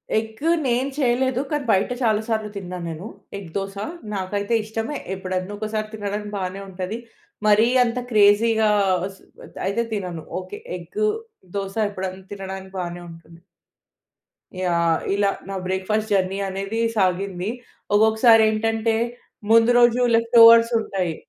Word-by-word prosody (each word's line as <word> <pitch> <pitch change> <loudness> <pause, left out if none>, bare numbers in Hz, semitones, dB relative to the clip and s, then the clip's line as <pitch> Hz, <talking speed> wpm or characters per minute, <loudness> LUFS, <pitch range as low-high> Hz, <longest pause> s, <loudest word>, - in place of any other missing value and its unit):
Egg 220 0 -2 0.3
నేను 250 +3 +1
చేయలేదు. 260 -1 +1
కానీ, 295 -2 -1
బయట 190 -1 +2
చాలాసార్లు 220 -1 0
తిన్నా 180 -2 -6
నేను. 165 +5 -6 0.3
ఎగ్ 190 -4 -9
దోస 195 0 -4 0.4
నాకైతే 200 +3 -2
ఇష్టమే 225 +6 -4 0.2
ఎప్పుడన్నా 185 +1 -4
ఒకసారి 215 0 -3
తినడానికి 210 0 -4
బానే 190 +1 -4
ఉంటది. 185 +3 -4 0.5
మరీ 210 +2 +5 0.2
అంత 245 +1 -1
క్రేజీగా 215 +1 +4 0.5
స్ - - -21 0.5
అయితే 200 +5 0
తినను. 180 -6 -4 0.2
ఓకే, 410 - -8 0.2
ఎగ్ 430 -1 -7 0.5
దోస 195 -1 -3
ఎప్పుడన్నా 190 -1 -6
తినడానికి 190 -1 -7
బానే 175 0 -5
ఉంటుంది. 165 0 -14 1.2
యాహ్. 170 -3 +1 0.2
ఇలా 200 0 +2 0.2
నా 195 - -4
బ్రేక్‌ఫాస్ట్ 210 +4 -1
జర్నీ 190 0 +1
అనేది 195 +4 -4 0.2
సాగింది. 190 0 0 0.5
ఒక్కొక్కసారి 220 +1 +5
ఏంటంటే 225 +1 0 0.6
ముందు 230 +1 +6
రోజు 240 0 +4
లెఫ్టోవర్స్ 230 0 +7
ఉంటాయి. 185 -6 -2
205 Hz, 120 wpm, -22 LUFS, 190-225 Hz, 1.2 s, లెఫ్టోవర్స్